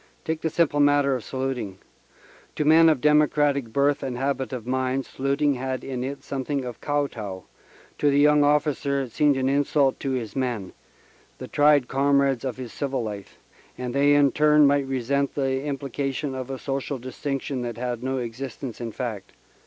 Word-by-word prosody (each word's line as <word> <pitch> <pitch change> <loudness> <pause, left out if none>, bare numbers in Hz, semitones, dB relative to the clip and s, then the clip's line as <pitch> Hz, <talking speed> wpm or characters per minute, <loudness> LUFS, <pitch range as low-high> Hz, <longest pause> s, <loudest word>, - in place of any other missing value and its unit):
Take 160 0 -2
the 160 - 0
simple 155 -3 +1
matter 145 -1 +4
of 125 - -5
saluting. 130 -7 -4 0.8
To 150 - -1
men 160 +2 +7
of 150 -6 +1
democratic 145 -4 +3
birth 140 +3 +2
and 125 -2 -4
habit 135 0 -2
of 125 -4 -5
mind, 130 +1 -1
saluting 140 +2 0
had 130 -1 -4
in 130 -2 -4
it 140 +2 -5
something 135 0 -3
of 120 -2 -7
kow 145 0 0
tow 100 -8 -7 0.6
to 145 - +3
the 140 - +2
young 150 0 +5
officer 145 -1 +1
it 125 - -8
seemed 145 +1 +3
an 130 0 0
insult 140 0 +2
to 135 - -3
his 115 -5 -4
men, 120 -8 -2 0.6
the - - -8
tried 145 -3 +4
comrades 140 -2 +2
of 130 -2 -3
his 125 -3 -7
civil 135 -4 -2
life, 105 -3 -7 0.4
and 125 -1 -4
they 145 +1 +4
in 140 -2 +4
turn 150 +1 +5
might 140 -1 +2
resent 135 +2 -1
the 135 -1 0
implication 140 0 -3
of 130 -1 -5
a 135 - -4
social 135 +1 -3
distinction 130 +1 -4
that 120 -2 -4
had 120 -1 -3
no 130 +1 -2
existence 125 +1 -6
in 115 -1 -4
fact. 110 -6 -5
135 Hz, 180 wpm, -24 LUFS, 125-145 Hz, 0.8 s, men